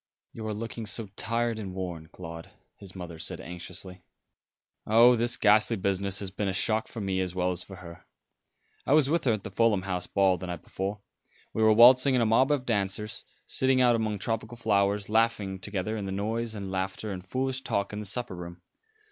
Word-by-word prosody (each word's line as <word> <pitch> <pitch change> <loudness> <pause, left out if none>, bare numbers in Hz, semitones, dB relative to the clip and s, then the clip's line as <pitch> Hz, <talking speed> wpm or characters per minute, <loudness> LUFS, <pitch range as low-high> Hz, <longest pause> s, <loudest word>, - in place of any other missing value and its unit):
"You 110 -1 -6
are 110 - -2
looking 115 0 -5
so 105 0 -1
tired 115 +1 -1
and 95 -3 -6
worn, 90 -4 -5
Claude," 80 -1 -9 0.3
his 95 -2 -12
mother 85 -3 -8
said - - -4
anxiously. 90 +1 -7 0.9
"Oh, 115 +3 +7
this 120 +1 +2
ghastly 110 +2 +4
business 100 0 -1
has 95 -2 -3
been 100 +1 -2
a 95 - -1
shock 110 +4 0
for 115 - -8
me 95 -1 -1
as 90 -1 -2
well 90 0 +1
as 90 0 -3
for 95 - -9
her. 85 -2 -12 0.8
I 135 - +1
was 150 -2 +4
with 165 -2 +1
her 125 - +4
at 105 -2 -4
the 100 - -7
Fulham 105 -2 +2
House 90 -2 -3
ball 95 -3 +2
the 90 - -6
night 90 -2 -6
before. 100 +2 -4 0.5
We 110 - -1
were 110 0 +6
waltzing 130 +4 +7
in 125 - +3
a - - +3
mob 115 +5 +4
of 140 -3 0
dancers, 105 -1 -2 0.2
sitting 130 0 +3
out 120 -2 +5
among 110 -2 -1
tropical 115 +3 -3
flowers, 100 -2 +1
laughing 105 -3 +1
together 100 +2 -3
in 100 -3 -4
the - - -4
noise 110 +3 -2
and 100 -2 -5
laughter 95 +3 -3
and 90 -2 -6
foolish 130 +6 -2
talk 100 -6 -2
in 105 - -4
the 105 - -6
supper 120 0 -3
room. 85 0 -9
105 Hz, 205 wpm, -28 LUFS, 95-115 Hz, 0.9 s, Oh